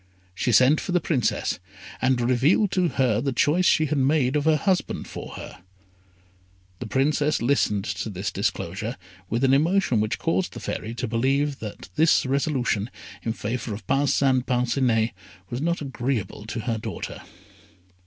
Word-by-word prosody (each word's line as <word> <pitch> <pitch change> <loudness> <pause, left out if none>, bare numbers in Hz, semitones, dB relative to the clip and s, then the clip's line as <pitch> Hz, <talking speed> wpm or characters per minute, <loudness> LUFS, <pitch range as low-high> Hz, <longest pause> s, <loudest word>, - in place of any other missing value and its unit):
She 110 +6 0
sent 130 +6 +5
for 180 - -4
the 180 - +4
Princess, 145 - 0 0.4
and 130 -1 +2
revealed 130 - +3
to 180 -2 +2
her 125 -8 +1
the 135 - 0
choice 160 +8 +2
she 155 -4 +4
had 150 -1 0
made 135 0 +2
of 150 +1 +1
a 155 -1 +5
husband 185 +2 -1
for - - -8
her. 95 - -9 1.2
The 120 - -5
Princess 145 +4 +1
listened 115 -6 +1
to - - -3
this 95 0 -3
disclosure - - -2 0.3
with 115 +4 -1
an 135 0 +4
emotion 155 - +3
which 110 0 -1
caused 175 +3 -1
the - - -7
Fairy 115 +2 -4
to 125 - -3
believe 135 +5 0
that 105 -2 -8
this 160 -2 +4
resolution 130 -6 0 0.3
in 115 - -2
favour 110 0 -3
of 105 -1 -11
Parcin 135 0 +2
Parcinet 120 -2 +1 0.4
was 120 +2 -3
not 170 +1 0
agreeable 125 -6 -3
to 115 +1 -4
her 115 -1 -2
daughter. 110 -5 -6
130 Hz, 160 wpm, -25 LUFS, 115-150 Hz, 1.2 s, sent